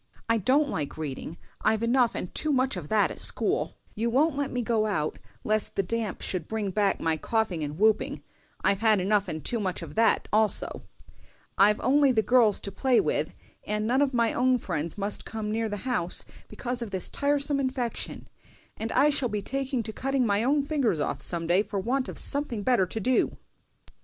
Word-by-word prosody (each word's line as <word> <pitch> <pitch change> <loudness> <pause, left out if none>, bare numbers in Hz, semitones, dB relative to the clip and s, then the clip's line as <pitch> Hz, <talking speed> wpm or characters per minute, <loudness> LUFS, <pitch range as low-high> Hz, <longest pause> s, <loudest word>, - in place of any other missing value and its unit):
I 230 0 +2
don't 275 +9 +3
like 150 - -4
reading, 155 +2 -5 0.2
I've 220 0 +1
enough 240 0 +2
and 180 - -5
too 310 - 0
much 265 -1 +1
of - - -6
that 215 -1 +2
at - - -8
school; - - +1 0.2
you 230 +2 -1
won't 280 +5 +2
let 285 -1 -1
me 245 -1 -2
go 220 -2 +1
out, 155 -7 -2 0.2
lest 215 -1 0
the 195 - +1
damp 220 +1 -3
should 175 -4 -2
bring 215 -3 -2
back 200 0 +1
my 160 -1 0
coughing 205 -3 -1
and 145 +1 -5
whooping—I've 210 -1 -1
had 220 -2 +4
enough 200 +2 +1
and 160 -3 -6
too 235 - -1
much 185 -3 -2
of - - -9
that 225 0 +2
also; 215 0 +2 0.7
I've 210 +2 +4
only 275 +2 +4
the 220 -3 +2
girls 235 -5 +4
to 200 - -6
play 250 +5 +2
with, - - -1 0.3
for 210 0 -2
none 240 +6 +1
of 285 -2 +2
my 235 -3 +1
own 255 +1 +3
friends 165 -7 -3
must 205 +1 -3
come 215 -1 -5
near 225 0 -1
the 205 - -3
house 180 -9 0 0.2
because 245 -1 -4
of 235 - -4
this 190 -2 -1
tiresome 285 0 +1
infection; 260 -3 -3 0.5
and 225 +1 -4
I 300 - +4
shall 275 -4 0
be 210 -1 -3
taking 270 -1 -2
to 220 0 -6
cutting 270 0 0
my 205 0 +1
own 280 +3 +2
fingers 275 - 0
off 140 -1 -2
some 170 +2 -1
day 175 +4 +3
for 205 -1 -4
want 255 +6 -1
of - - -7
something 280 -7 +2
better 225 -5 +2
to 220 - -4
do!" 255 +4 +1
220 Hz, 200 wpm, -27 LUFS, 200-255 Hz, 0.7 s, had